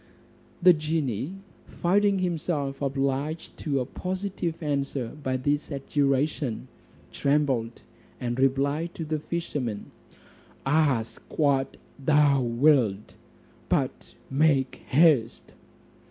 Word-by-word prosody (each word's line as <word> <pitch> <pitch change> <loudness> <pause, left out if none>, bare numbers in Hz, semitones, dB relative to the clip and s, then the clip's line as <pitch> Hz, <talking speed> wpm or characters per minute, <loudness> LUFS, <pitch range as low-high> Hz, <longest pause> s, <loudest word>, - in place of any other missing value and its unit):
The 180 0 +9
genie 150 - -2 0.3
finding 200 +3 +2
himself 165 -6 -2
obliged 140 +3 -2
to 140 -3 -1
a - - -2
positive 185 +2 -3
answer 140 -4 -2
by 130 -2 -1
this 145 +3 -1
adjuration, 140 -2 -1 0.4
trembled; 135 -5 0 0.4
and 120 0 -3
replied 140 +5 +1
to 165 - -4
the 155 0 -2
fisherman, 145 -10 -4 0.7
"Ask 135 -6 +1 0.2
what 140 -3 +2 0.3
thou 145 -1 +4
wilt, 120 -4 +2 0.6
but - - -1 0.2
make 140 -2 +2
haste." 140 -6 +3
140 Hz, 95 wpm, -26 LUFS, 130-155 Hz, 0.7 s, The